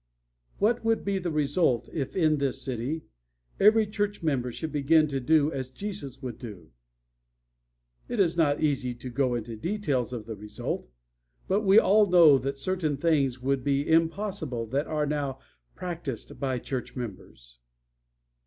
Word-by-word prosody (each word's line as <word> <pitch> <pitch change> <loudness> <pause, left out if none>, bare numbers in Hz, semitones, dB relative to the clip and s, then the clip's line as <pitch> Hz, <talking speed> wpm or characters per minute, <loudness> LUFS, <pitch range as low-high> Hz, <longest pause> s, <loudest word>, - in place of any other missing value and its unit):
"What 225 +3 +1
would 225 0 +1
be 200 -1 0
the 180 -1 -2
result 145 -4 +1
if 140 -4 -3
in 155 -5 +3
this 140 -2 -1
city 130 +5 -3 0.6
every 215 +2 +6
church 205 -2 -2
member 130 -6 0
should 155 +6 -5
begin 155 +2 +3
to 135 -1 -1
do 150 +3 +3
as 130 -3 -4
Jesus 140 -5 -7
would 120 -4 -6
do? 105 -7 -10 1.4
It 240 - -3
is 170 -4 +3
not 150 -3 +2
easy 135 -5 0
to 125 +1 -8
go 130 -1 +1
into 115 -1 -5
details 145 - -1
of 115 -4 -5
the 110 -1 -6
result. 105 -10 -5 0.6
But 200 +3 +2
we 200 0 +5
all 210 -1 +6
know 165 -6 +7
that 135 +2 -3
certain 155 -1 -1
things 140 -5 +1
would 135 -1 0
be 140 0 0
impossible 165 - 0
that 140 +5 -1
are 150 -1 0
now 140 -2 -2 0.4
practiced 165 -10 -6
by 130 -2 -1
church 125 +1 -5
members. 95 - -8
145 Hz, 155 wpm, -27 LUFS, 125-170 Hz, 1.4 s, know